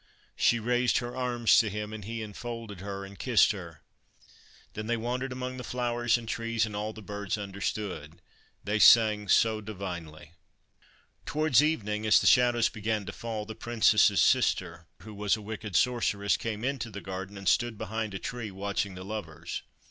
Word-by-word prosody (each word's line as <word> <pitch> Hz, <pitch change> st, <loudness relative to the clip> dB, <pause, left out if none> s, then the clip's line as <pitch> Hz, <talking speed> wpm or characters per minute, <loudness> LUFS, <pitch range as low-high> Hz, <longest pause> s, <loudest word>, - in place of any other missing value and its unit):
She 120 Hz, -, +3 dB
raised 120 Hz, +2 st, +2 dB
her 120 Hz, 0 st, -3 dB
arms 120 Hz, -3 st, +3 dB
to 110 Hz, -, +2 dB
him, 105 Hz, +1 st, -5 dB
and 110 Hz, -2 st, -7 dB
he 115 Hz, +2 st, -5 dB
enfolded 110 Hz, -1 st, -7 dB
her 100 Hz, 0 st, -5 dB
and 100 Hz, 0 st, -13 dB
kissed 120 Hz, -6 st, +4 dB
her. 85 Hz, -8 st, -9 dB, 0.9 s
Then 110 Hz, 0 st, -5 dB
they 120 Hz, 0 st, +1 dB
wandered 125 Hz, +3 st, -3 dB
among 130 Hz, 0 st, -5 dB
the 125 Hz, -, -6 dB
flowers 120 Hz, -1 st, 0 dB
and 115 Hz, -1 st, -9 dB
trees, 115 Hz, 0 st, 0 dB
and 105 Hz, -2 st, -7 dB
all 105 Hz, +1 st, -2 dB
the 110 Hz, -1 st, -11 dB
birds 100 Hz, -1 st, -3 dB
understood: 100 Hz, -5 st, -5 dB, 0.4 s
they 105 Hz, +1 st, -1 dB
sang 105 Hz, -2 st, +6 dB
so 110 Hz, +1 st, +3 dB
divinely. 85 Hz, -7 st, -7 dB, 1.0 s
Towards 150 Hz, -4 st, +3 dB
evening, 110 Hz, -9 st, -1 dB
as 105 Hz, -, +7 dB
the -, -, -3 dB
shadows 120 Hz, +1 st, +5 dB
began 110 Hz, -1 st, -2 dB
to 105 Hz, -, -5 dB
fall, 110 Hz, -2 st, -5 dB
the 110 Hz, -, -7 dB
Princess's 110 Hz, -3 st, +3 dB
sister, 90 Hz, -9 st, +1 dB, 0.2 s
who 110 Hz, +1 st, -10 dB
was 105 Hz, +1 st, 0 dB
a -, -, -9 dB
wicked 105 Hz, -2 st, -6 dB
Sorceress, 105 Hz, -5 st, +2 dB
came 110 Hz, -1 st, -4 dB
into 130 Hz, -3 st, -2 dB
the 100 Hz, -2 st, -7 dB
garden 95 Hz, +1 st, -6 dB
and 100 Hz, -1 st, -7 dB
stood 120 Hz, +3 st, +2 dB
behind 110 Hz, -1 st, -4 dB
a -, -, -1 dB
tree 120 Hz, +2 st, -5 dB
watching 100 Hz, 0 st, -3 dB
the 95 Hz, 0 st, -8 dB
lovers. 85 Hz, -6 st, -6 dB
110 Hz, 175 wpm, -29 LUFS, 100-120 Hz, 1.0 s, as